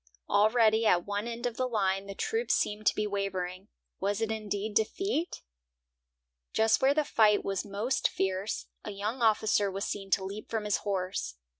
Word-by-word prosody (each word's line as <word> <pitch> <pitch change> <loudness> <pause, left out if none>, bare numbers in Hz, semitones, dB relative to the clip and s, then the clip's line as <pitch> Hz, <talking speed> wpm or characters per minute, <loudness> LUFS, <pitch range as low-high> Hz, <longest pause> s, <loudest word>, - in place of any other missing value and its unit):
Already 220 +1 +4
at 175 -3 +3
one 205 +2 -2
end 235 0 -5
of 240 -2 -2
the 255 - 0
line 195 -4 0
the 195 - -7
troops 450 - 0
seemed 210 0 -1
to - - +4
be 210 - 0
wavering. 195 -2 -3 0.3
Was 200 +1 0
it 225 -1 -1
indeed 210 -1 -3
defeat? 340 - -1 1.1
Just 220 0 +3
where 270 +2 +4
the 305 -1 +2
fight 210 -5 +3
was 195 -1 -1
most 210 +6 0
fierce, 190 +2 -2 0.2
a - - -6
young 210 +5 -4
officer 215 -2 +3
was 195 +1 -3
seen 195 -1 -4
to 195 - +2
leap 200 +3 -7
from 220 -2 -2
his 210 - +2
horse. 185 - -3
210 Hz, 175 wpm, -30 LUFS, 195-225 Hz, 1.1 s, Already